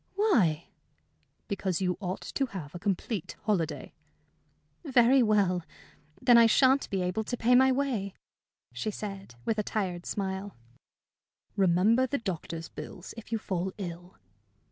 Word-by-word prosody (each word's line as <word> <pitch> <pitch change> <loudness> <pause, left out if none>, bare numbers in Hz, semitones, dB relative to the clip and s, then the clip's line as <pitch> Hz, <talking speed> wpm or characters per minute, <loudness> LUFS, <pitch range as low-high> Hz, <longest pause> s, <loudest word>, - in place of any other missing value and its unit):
"Why?" 210 - +2 0.8
"Because 190 -4 -1
you 180 -2 0
ought 185 -2 -4
to 275 - -1
have 170 - -8
a 175 - -6
complete 200 0 -2
holiday." 165 -8 -1 0.9
"Very 260 -2 +5
well. 200 -5 +2 0.6
Then 240 -1 +6
I 230 - +7
sha'n't 265 +4 +4
be 190 -2 -1
able 180 +5 -1
to 245 +3 -4
pay 240 +2 +3
my 260 +1 +6
way," 250 -8 -1 0.6
she 125 - -3
said, 195 - -7
with 220 -1 0
a - - +1
tired 185 -5 -3
smile. 195 0 -3 1.0
"Remember 200 +7 +3
the 280 - -1
doctor's 170 - -5
bills 180 - -9
if 230 -1 -11
you 225 - +1
fall 190 -3 -3
ill." 175 -1 -7
200 Hz, 140 wpm, -29 LUFS, 180-230 Hz, 1.0 s, I